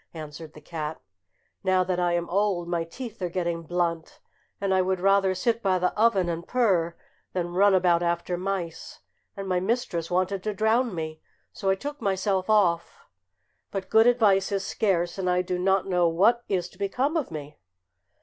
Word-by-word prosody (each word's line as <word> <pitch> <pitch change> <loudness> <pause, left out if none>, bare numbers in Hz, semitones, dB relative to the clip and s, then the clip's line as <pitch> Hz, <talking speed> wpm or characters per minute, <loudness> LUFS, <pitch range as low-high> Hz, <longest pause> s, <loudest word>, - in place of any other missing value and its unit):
answered 155 0 -8
the 150 - -12
cat. 155 0 -5 0.6
"Now 185 -1 +3
that 180 -1 -1
I 175 -1 +1
am 175 0 -1
old 190 -2 0
my 170 -1 -1
teeth 225 +6 -9
are 180 - -1
getting 170 -1 -2
blunt, 170 -1 -2 0.4
and 195 -1 0
I 190 - +4
would 185 0 0
rather 195 0 +3
sit 230 +5 0
by 190 -3 +2
the 180 0 0
oven 210 -5 +3
and 170 0 -4
purr 185 -9 +1 0.4
than 175 -1 -2
run 195 +2 +5
about 175 -2 +3
after 170 +1 -1
mice, 180 -2 -4 0.4
and 195 0 -5
my 185 -1 +1
mistress 185 -5 -1
wanted 185 +2 0
to 210 +1 -3
drown 220 +1 +1
me; 155 -1 -5 0.3
so 195 - -2
I 190 - +4
took 290 +7 -7
myself 190 -1 0
off; 205 - +2 0.7
but 195 -1 -5
good 220 +1 +6
advice 210 -5 +3
is 195 -1 -1
scarce, 185 -4 0
and 185 -1 0
I 180 0 +2
do 180 0 -2
not 190 +1 +2
know 180 -3 +2
what 210 +9 +3
is 180 -3 0
to - - -21
become 255 - 0
of 315 -5 -1
me." 150 -2 -8
185 Hz, 185 wpm, -26 LUFS, 170-200 Hz, 0.7 s, good